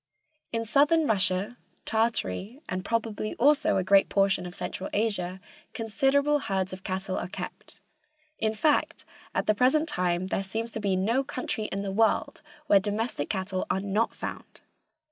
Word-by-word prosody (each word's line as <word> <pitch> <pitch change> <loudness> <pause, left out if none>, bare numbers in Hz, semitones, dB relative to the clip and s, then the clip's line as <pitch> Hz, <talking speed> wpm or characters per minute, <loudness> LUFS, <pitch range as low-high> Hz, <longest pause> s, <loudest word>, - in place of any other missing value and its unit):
In 230 0 -1
Southern 295 +7 +4
Russia, 200 0 +1 0.3
Tartary 220 - -1
and 185 0 -3
probably 225 -1 -2
also 285 -4 +4
a 190 - +1
great 195 +1 +5
portion 195 -2 +2
of 175 - -8
Central 190 - -4
Asia 195 -4 0 0.4
considerable 275 +6 +2
herds 190 -6 -2
of 185 +1 -8
cattle 190 0 -2
are - - -4
kept." 185 - -8 0.6
In 220 0 0
fact, 295 +7 +1 0.3
at - - +1
the 215 - +4
present 265 +8 +3
time 180 - 0
there 195 - 0
seems 225 +4 -4
to 220 - -4
be 200 -3 +1
no 225 +8 +1
country 250 -4 -3
in 200 -1 -3
the 195 - -3
world 220 +3 +1 0.2
where 200 - +6
domestic 205 -5 -2
cattle 190 -1 -2
are - - +1
not 200 +3 0
found. - - -7
210 Hz, 160 wpm, -27 LUFS, 190-230 Hz, 0.6 s, where